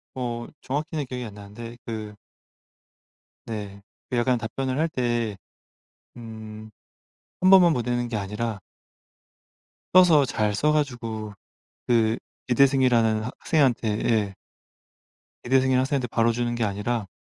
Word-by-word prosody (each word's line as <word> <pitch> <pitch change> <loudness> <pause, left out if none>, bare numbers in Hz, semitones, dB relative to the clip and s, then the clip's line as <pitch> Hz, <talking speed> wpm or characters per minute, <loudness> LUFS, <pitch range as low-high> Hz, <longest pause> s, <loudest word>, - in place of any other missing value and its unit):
어 120 -2 -4
정확히는 150 +2 -3
기억이 125 -1 -5
안 105 - -8
나는데 110 +4 -10
그 110 -2 -6 1.3
네. 100 -3 -6 0.3
그 125 - -1
약간 125 +1 +2
답변을 130 +3 -3
할 165 +1 +1
때 120 -6 -1 0.8
음 110 -2 -9 0.7
1 185 - +5
번만 180 -4 +7
보내는 120 0 -1
게 115 - -3
아니라 105 +2 -3 1.4
써서 170 -6 +7
잘 105 -4 0
써 150 +8 +2
가지고 115 -8 -2 0.5
그 115 -2 +3 0.3
기대승이라는 125 -4 +3
학생한테 130 -2 +1 0.2
예. 105 -4 +1 1.1
기대승이라는 130 0 +3
학생한테 135 -2 -1
바로 115 0 +2
주는 120 +1 -1
게 120 - -1
아니라 105 +1 -2
120 Hz, 240 characters per minute, -25 LUFS, 110-130 Hz, 1.4 s, 번만